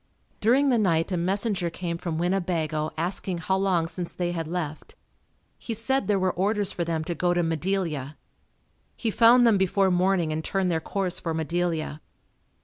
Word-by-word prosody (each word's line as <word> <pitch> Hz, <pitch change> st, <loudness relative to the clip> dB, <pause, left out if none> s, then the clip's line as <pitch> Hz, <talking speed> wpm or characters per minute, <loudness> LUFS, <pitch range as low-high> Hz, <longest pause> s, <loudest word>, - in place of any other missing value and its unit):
During 260 Hz, +6 st, +3 dB
the 245 Hz, -3 st, +3 dB
night 170 Hz, -3 st, +1 dB
a -, -, +1 dB
messenger 190 Hz, +1 st, 0 dB
came 170 Hz, 0 st, -4 dB
from 165 Hz, -3 st, -3 dB
Winnebago 170 Hz, -4 st, -1 dB
asking 175 Hz, +2 st, -2 dB
how 180 Hz, +3 st, 0 dB
long 190 Hz, -4 st, +1 dB
since 175 Hz, +1 st, -6 dB
they 175 Hz, -1 st, -2 dB
had 165 Hz, -2 st, -3 dB
left. 160 Hz, -3 st, -5 dB, 0.6 s
He 230 Hz, -, -4 dB
said 265 Hz, +5 st, 0 dB
there 205 Hz, -2 st, +3 dB
were 185 Hz, -1 st, +1 dB
orders 205 Hz, +1 st, 0 dB
for 175 Hz, -, -2 dB
them 165 Hz, -1 st, -2 dB
to 170 Hz, -, -3 dB
go 175 Hz, +1 st, +1 dB
to 175 Hz, -, +2 dB
Madelia. 165 Hz, -4 st, -2 dB, 0.8 s
He 225 Hz, -, -1 dB
found 240 Hz, +3 st, +6 dB
them 220 Hz, -4 st, +4 dB
before 190 Hz, 0 st, +2 dB
morning 180 Hz, -2 st, +2 dB
and 155 Hz, +1 st, -2 dB
turned 190 Hz, 0 st, 0 dB
their 165 Hz, -, +1 dB
course 190 Hz, 0 st, -2 dB
for 165 Hz, -2 st, -3 dB
Madelia. 160 Hz, -1 st, -2 dB
180 Hz, 175 wpm, -26 LUFS, 165-195 Hz, 0.8 s, found